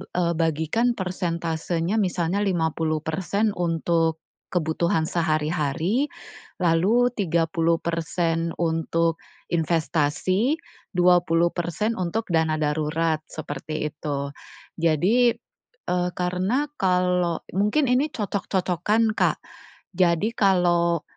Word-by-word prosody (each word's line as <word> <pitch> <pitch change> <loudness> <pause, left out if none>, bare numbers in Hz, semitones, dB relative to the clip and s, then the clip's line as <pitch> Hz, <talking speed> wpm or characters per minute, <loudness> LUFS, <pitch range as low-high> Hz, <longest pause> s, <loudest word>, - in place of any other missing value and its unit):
eee, 170 -1 +1
bagikan 165 +10 +1
persentasenya 170 0 -2
misalnya 180 0 0
50% 165 +2 0
untuk 165 -1 0 0.3
kebutuhan 160 -1 0
sehari-hari, 160 - 0 0.6
lalu 200 +9 +3
30% 165 -2 0
untuk 165 0 0 0.3
investasi, 170 - +1 0.4
20% 175 +3 +2
untuk 185 +5 -1
dana 160 -1 +2
darurat, 155 +1 0
seperti 150 +1 -5
itu. 140 -1 -4 0.5
Jadi 195 +10 +3 0.5
e - - +1 0.2
karena 185 +9 0 0.2
kalau 180 -2 +1
mungkin 210 +9 +2
ini 260 +4 +3
cocok-cocokan, 200 +1 0
Kak. - - +1 0.6
Jadi 175 +3 +2
kalau 175 -4 +2
170 Hz, 80 wpm, -24 LUFS, 160-190 Hz, 0.6 s, lalu